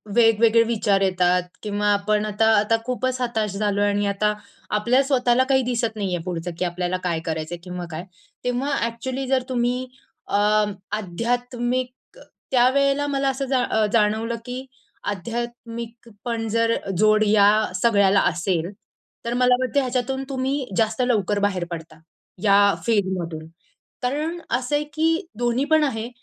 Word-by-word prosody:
वेगवेगळे 225 0 +5
विचार 210 -4 +1
येतात 180 -1 +2 0.2
किंवा 205 0 -1
आपण 210 +1 +1
आता 215 +1 +1
आता 220 +2 +2
खूपच 255 0 -1
हताश 220 -4 -1
झालोय 205 -1 +1
आणि 205 0 0
आता 210 +1 +1 0.4
आपल्या 240 +6 +3
स्वतःला 255 -2 +3
काही 265 -1 +4
दिसत 230 -2 -1
नाही 195 -4 -2
आहे 165 - -5
पुढचं, 175 -1 -4
की 180 - +1
आपल्याला 180 +1 -2
काय 170 -2 0
करायचं 160 +1 -3
आहे 175 - -13
किंवा 180 -1 -6
काय, 160 +3 -6 0.4
तेव्हा 250 +3 -1
ॲक्चुअली 255 +3 -4
जर 260 -1 +2
तुम्ही 250 +1 0 0.4
अ, - - -2 0.6
आध्यात्मिक 245 +5 -2 0.6
त्यावेळेला 275 +3 +3
मला 275 -1 0
असं 270 +1 -2
जा 255 -2 +2
अ, 220 -2 +1
जाणवलं 220 +1 +2
की 255 +2 -6 0.5
आध्यात्मिक 235 +2 -6 0.2
पण 230 -2 -2
जर 230 +1 +2 0.2
जोड 215 +2 +4
या 205 -1 +6 0.3
सगळ्याला 200 -4 +4
असेल 175 +1 -1 0.5
तर 235 - -1
मला 250 0 +5
वाटतं 255 +2 +1
ह्याच्यातून 260 +1 -1
तुम्ही 265 0 -1 0.2
जास्त 220 +2 +1
लवकर 210 -5 +1
बाहेर 200 -3 0
पडता, 160 -1 -7 0.5
या 200 0 +5
फीडमधून. 185 -7 -1 0.6
कारण 305 +7 -2 0.2
असं 260 +3 -3
आहे 295 - -1
की 325 +2 +1
दोन्ही 240 +2 +1
पण 310 +1 +3
आहे. 230 -5 -2
230 Hz, 145 wpm, -23 LUFS, 200-250 Hz, 0.6 s, या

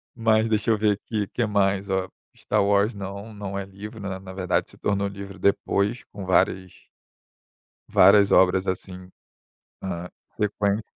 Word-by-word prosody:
Mas, 110 -1 +3
deixa 110 +1 +1
eu 110 - +4
ver 105 0 +3
aqui, 105 +1 -3
que 120 - -1
mais, 100 -1 +1
ó. 95 -1 -1 0.3
Star - - 0
Wars, 100 +2 +2
não, 100 +2 -7
não 100 -2 -5
é 100 - -3
livro. 100 +4 -10
Na 100 -1 -4
na 95 -1 -10
verdade 95 -2 -1
se - - -15
tornou 100 -1 0
livro 100 -1 -9
depois, 100 +4 +1
com 100 -1 -7
várias 95 0 0 1.0
várias 100 +1 +6
obras, 95 +1 +4
assim, 90 0 -5 0.7
na 90 -2 -5 0.3
sequência. 105 0 0
100 Hz, 155 wpm, -24 LUFS, 95-105 Hz, 1.0 s, várias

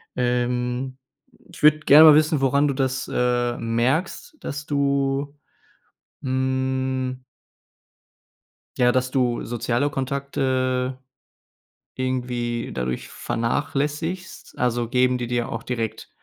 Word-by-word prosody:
Ähm, 125 +1 -1 0.6
ich - - -12
würde 150 0 +6
gerne 155 +1 +8
mal 155 -2 +9
wissen, 155 0 +3
woran 140 +2 +2
du - - 0
das, 130 -1 -2
äh, 120 -1 +1
merkst, 130 - -1
dass 150 +1 -6
du, 140 0 0 0.8
hm 130 -1 -1 1.5
ja, 125 -1 +4
dass 130 0 0
du 125 -3 0
soziale 120 +3 -1
Kontakte 130 -2 -1 1.0
irgendwie 125 -2 -2
dadurch 65 0 -3
vernachlässigst? 150 +8 -3
Also, 120 -1 0
geben 125 +1 +2
die 120 -1 -4
dir 120 -1 -1
auch - - -4
direkt 115 -3 -4
130 Hz, 105 wpm, -23 LUFS, 125-140 Hz, 1.5 s, mal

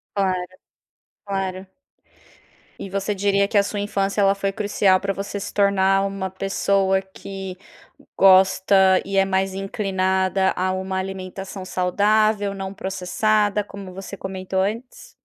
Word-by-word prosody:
Claro, 185 -2 0 0.8
claro. 195 -2 -3 1.1
E 195 - -7
você 200 +2 -2
diria 200 0 +2
que 210 - -3
a 200 - +6
sua 205 +1 -4
infância, 200 0 -1
ela 195 0 +4
foi 195 0 -2
crucial 200 -2 +2
para 195 0 -1
você 200 +1 -5
se 200 - -6
tornar 195 -1 +3
uma 195 -1 -3
pessoa 195 0 +1
que 190 0 -8 0.6
gosta 190 0 +5
e 195 0 -3
é 195 - +5
mais 190 0 0
inclinada 190 -1 0
a 185 +1 0
uma 190 0 -3
alimentação 190 0 -6
saudável, 205 +3 +1
não 195 0 -6
processada, 205 +2 0
como 200 -2 -10
você 195 +1 -8
comentou 190 0 -3
antes? 225 +6 -4
195 Hz, 135 wpm, -22 LUFS, 190-200 Hz, 1.1 s, a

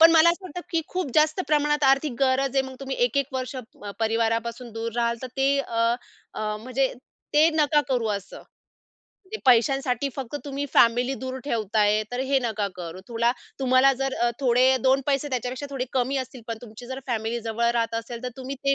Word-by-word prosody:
पण 330 +1 +10
मला 325 +1 +7
असं 365 +2 -5
वाटतं 355 0 -6
की 330 -2 +1
खूप 365 -7 -3
जास्त 310 +4 +3
प्रमाणात 295 0 +2
आर्थिक 270 +1 +3
गरज 270 0 +2
आहे. 265 - +4
मग 260 - -9
तुम्ही 270 0 -4
1-1 270 +3 +1
वर्ष 255 +1 -3
मग 220 -4 -9
परिवारापासून 230 +2 0
दूर 225 0 -4
राहाल 235 0 +1
तर 255 - -3
ते 275 +1 +3
अ, 230 -2 +1 0.4
अ, 215 0 -2
म्हणजे 255 +2 0 0.4
ते 310 +2 +6
नका 300 -1 +4
करू 245 -4 +1
असं. 200 - -10 0.9
ते - - -1
पैशांसाठी 260 +2 +3
फक्त 265 0 -5
तुम्ही 280 0 -3
फॅमिली 245 +3 +4
दूर 260 0 -4
ठेवताय 215 -3 +1
तर 250 - -2
हे 275 -1 +4
नका 215 -3 -1
करु. 175 0 -7
तुला 235 +1 +2 0.3
तुम्हाला 260 +1 +5
जर 270 0 0
अ, 240 0 +1
थोडे 255 +1 +4
2 265 +1 +4
पैसे 280 0 +1
त्याच्यापेक्षा 255 +1 -3
थोडे 260 -2 -2
कमी 265 +1 0
असतील. 260 -1 -5
पण 225 -1 -3
तुमची 235 +1 -11
जर 260 +1 -5
फॅमिली 230 0 -2
जवळ 230 +1 0
राहत 230 -1 0
असेल 230 +1 -5
तर - - -1
तुम्ही 265 +1 -5
ते 275 0 +4
255 Hz, 190 wpm, -25 LUFS, 230-275 Hz, 0.9 s, पण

